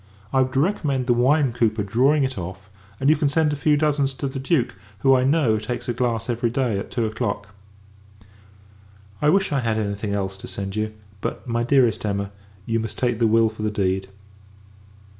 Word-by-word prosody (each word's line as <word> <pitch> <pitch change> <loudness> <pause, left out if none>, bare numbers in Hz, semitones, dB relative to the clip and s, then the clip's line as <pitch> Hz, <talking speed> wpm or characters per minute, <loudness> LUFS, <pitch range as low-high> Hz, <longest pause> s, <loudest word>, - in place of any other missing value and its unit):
I 130 - +4
would 130 +1 -1
recommend 140 -5 +1
the 120 - +3
wine 130 +2 +3
cooper 110 -3 +1
drawing 130 +8 +3
it 130 -1 -1
off: 95 +1 -7 0.3
and 135 - 0
you 155 - +6
can 145 -2 +1
send 150 0 +2
a - - -1
few 150 +1 +2
dozens 145 -3 +1
to 140 - -3
the 135 0 -5
Duke; 135 -2 +1 0.3
who, 135 - +5
I 125 - +2
know, 130 -6 +3
takes 120 +2 -5
a 120 - 0
glass 120 -2 -1
every 120 -1 0
day 120 -4 0
at - - -6
two 120 -2 -1
o'clock. 105 -2 -3 1.7
I 150 - +4
wish, 195 +1 +2
I 140 - +1
had 115 -3 0
any 105 -2 -1
thing 100 0 -4
else 95 -1 -3
to - - -9
send 100 0 -5
you; 110 0 -1 0.3
but, - - -4
my 120 0 0
dearest 125 -2 +3
Emma, 100 -1 -2 0.3
you 115 0 0
must 110 -1 -5
take 120 -3 0
the 115 - +4
will 115 +1 +4
for 110 0 -10
the 110 - 0
deed. 95 -2 -1
120 Hz, 205 wpm, -23 LUFS, 110-135 Hz, 1.7 s, you